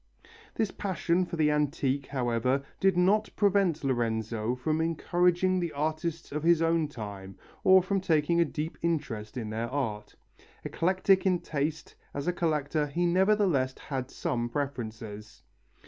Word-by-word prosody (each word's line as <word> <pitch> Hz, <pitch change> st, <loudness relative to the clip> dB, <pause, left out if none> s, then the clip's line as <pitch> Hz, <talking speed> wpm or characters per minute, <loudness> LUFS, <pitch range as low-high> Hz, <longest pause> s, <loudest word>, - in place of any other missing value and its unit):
This 220 Hz, -4 st, 0 dB
passion 185 Hz, -2 st, 0 dB
for -, -, -5 dB
the 155 Hz, -2 st, +3 dB
antique, 145 Hz, -2 st, 0 dB
however, 130 Hz, 0 st, 0 dB, 0.2 s
did 190 Hz, -2 st, +3 dB
not 200 Hz, +4 st, +3 dB
prevent 195 Hz, -6 st, +2 dB
Lorenzo 115 Hz, -2 st, -1 dB
from 155 Hz, +5 st, -1 dB
encouraging 175 Hz, +3 st, +2 dB
the 170 Hz, -2 st, -3 dB
artists 155 Hz, +3 st, -3 dB
of 150 Hz, +1 st, -2 dB
his 170 Hz, +1 st, +4 dB
own 165 Hz, -1 st, +2 dB
time 100 Hz, -7 st, -8 dB, 0.3 s
or 190 Hz, -1 st, +7 dB
from 195 Hz, +1 st, 0 dB
taking 170 Hz, -1 st, +2 dB
a -, -, +4 dB
deep 155 Hz, +1 st, -5 dB
interest 135 Hz, -9 st, -2 dB
in 110 Hz, -3 st, -4 dB
their 115 Hz, +2 st, -3 dB
art. 110 Hz, -7 st, -3 dB, 0.5 s
Eclectic 190 Hz, +2 st, +2 dB
in 185 Hz, -1 st, +3 dB
taste, 155 Hz, 0 st, -3 dB, 0.2 s
as 140 Hz, 0 st, -3 dB
a 180 Hz, -, +1 dB
collector 155 Hz, -3 st, 0 dB
he 170 Hz, +5 st, -1 dB
nevertheless 180 Hz, -7 st, +2 dB
had 130 Hz, -2 st, -5 dB
some 120 Hz, -1 st, -2 dB
preferences. 110 Hz, -6 st, -5 dB
150 Hz, 145 wpm, -29 LUFS, 125-175 Hz, 0.5 s, or